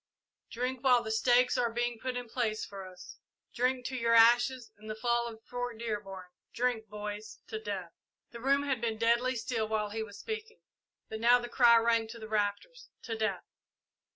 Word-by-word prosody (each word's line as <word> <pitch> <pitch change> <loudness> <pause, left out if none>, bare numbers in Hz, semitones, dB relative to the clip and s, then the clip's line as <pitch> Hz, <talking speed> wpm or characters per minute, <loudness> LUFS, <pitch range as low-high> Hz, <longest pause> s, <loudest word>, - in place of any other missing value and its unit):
Drink 250 +2 -3
while 250 -3 +5
the 220 - -4
stakes 245 +3 +3
are 240 -2 +1
being 240 0 -2
put 255 +1 -3
in 245 -1 -5
place 220 -2 -1
for 195 -2 -9
us 185 0 -12 0.3
drink 250 0 0
to 260 - -3
your 230 -2 +2
ashes 240 +2 +5
and 215 +1 -12
the 215 - -3
fall 235 +1 0
of 225 -1 -10
Fort 245 -2 -4
Dearborn 205 -5 -5 0.3
drink, 240 -2 -1
boys 210 +1 -6
to 220 - -4
Death!" 200 -5 -5 0.4
The 235 - -9
room 275 +2 +3
had 265 -5 -1
been 225 -2 -1
deadly 235 +3 +2
still 225 -1 -2
while 215 -1 -1
he 220 +1 -3
was 205 -2 -7
speaking, 445 0 -6 0.5
but 220 - -6
now 240 +2 +6
the 240 0 -6
cry 240 -1 +6
rang 230 -1 +2
to 230 +1 -9
the 220 - -8
rafters, 215 - -2
"To 230 - -4
Death!" 220 0 -1
230 Hz, 190 wpm, -31 LUFS, 220-245 Hz, 0.5 s, now